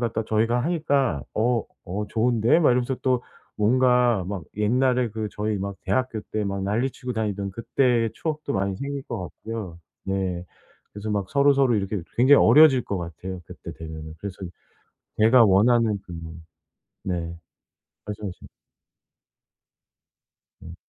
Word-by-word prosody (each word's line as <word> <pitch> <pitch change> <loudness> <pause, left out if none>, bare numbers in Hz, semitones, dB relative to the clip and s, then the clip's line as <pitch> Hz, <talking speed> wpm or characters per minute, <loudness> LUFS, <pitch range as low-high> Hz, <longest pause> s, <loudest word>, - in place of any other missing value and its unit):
갖다 115 -2 -1
저희가 115 +3 +1
하니까 140 - +1
"어. 115 +1 +1 0.2
어 100 +4 -4
좋은데?" 115 +3 +3
막 150 - +5
이러면서 125 +1 +1
또 125 -2 +1 0.3
뭔가 125 -1 +3
막 95 -4 -5
옛날에 125 +3 +2
그 110 0 -4
저희 105 0 -2
막 100 0 -4
대학교 110 +3 -1
때 110 - 0
막 100 -1 -3
난리치고 125 +5 -2
다니던 100 -3 -2
그때의 115 +2 +1
추억도 155 -3 -3
많이 100 0 0
생길 140 +2 -4
것 120 -6 -5
같고요. 90 +1 -7 0.3
네. 95 -2 -2 0.5
그래서 105 +1 -5
막 100 -2 -1
서로서로 140 -3 +4
이렇게 100 0 -1
또 95 - -4
굉장히 130 +4 +6
어려질 135 0 +7
것 100 - -3
같아요 90 +2 -6
그때 - - -9
되면은. 80 -1 -8
그래서 100 +1 -7 0.8
제가 115 +2 +6
원하는 110 +2 +4
그 90 - -9 0.9
네. 85 -2 -3 0.7
말씀하신 105 -3 -7 2.1
음. 85 - -10
110 Hz, 280 characters per minute, -24 LUFS, 95-125 Hz, 2.1 s, 어려질